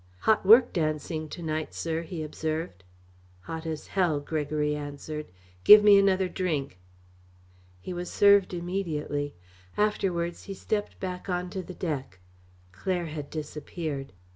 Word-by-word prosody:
"Hot 220 - +3
work 230 +5 +7
dancing 155 -1 -2
to 170 - -7
night, 155 -1 -3
sir," 165 0 -2
he 165 -1 -5
observed. 155 - -4 0.6
"Hot 160 - -6
as 155 -1 -4
hell," 175 -6 +1
Gregory 150 0 -1
answered. 150 +1 -6 0.4
"Give 210 0 +10
me 205 -1 +8
another 190 -1 +3
drink." 155 - -2 1.0
He 180 - -6
was 175 0 -5
served 200 -1 +5
immediately. 170 -5 -3 0.4
Afterwards 180 -5 0
he 195 - -6
stepped 205 +2 -3
back 180 0 -5
on 180 0 -2
to 190 - -3
the 185 0 -9
deck. 135 - -4 0.5
Claire 175 - -2
had 150 -2 -6
disappeared. 150 -2 -5
165 Hz, 135 wpm, -28 LUFS, 150-185 Hz, 1.0 s, Give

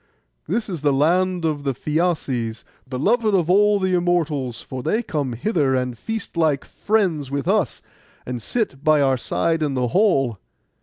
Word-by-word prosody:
'This 215 +6 -1
is 175 -7 -5
the 145 -1 +3
land 175 +5 +2
of 150 -3 -1
the 135 -2 -1
Phæaces, 140 -8 -1 0.3
beloved 215 - +1
by 180 - +4
all 210 +1 +4
the 190 -1 0
Immortals; 160 -9 0
for 130 -1 -7
they 220 - 0
come 145 - -2
hither 140 - +1
and 125 -1 -1
feast 225 - -5
like 155 -4 +1
friends 185 -10 0
with 140 0 -3
us, - - 0 0.4
and 125 -1 -4
sit 140 - -2
by 155 -1 +4
our 135 -2 +3
side 165 +5 -1
in 145 -3 0
the 125 -1 0
hall. 135 - +2
155 Hz, 165 wpm, -22 LUFS, 135-185 Hz, 0.4 s, by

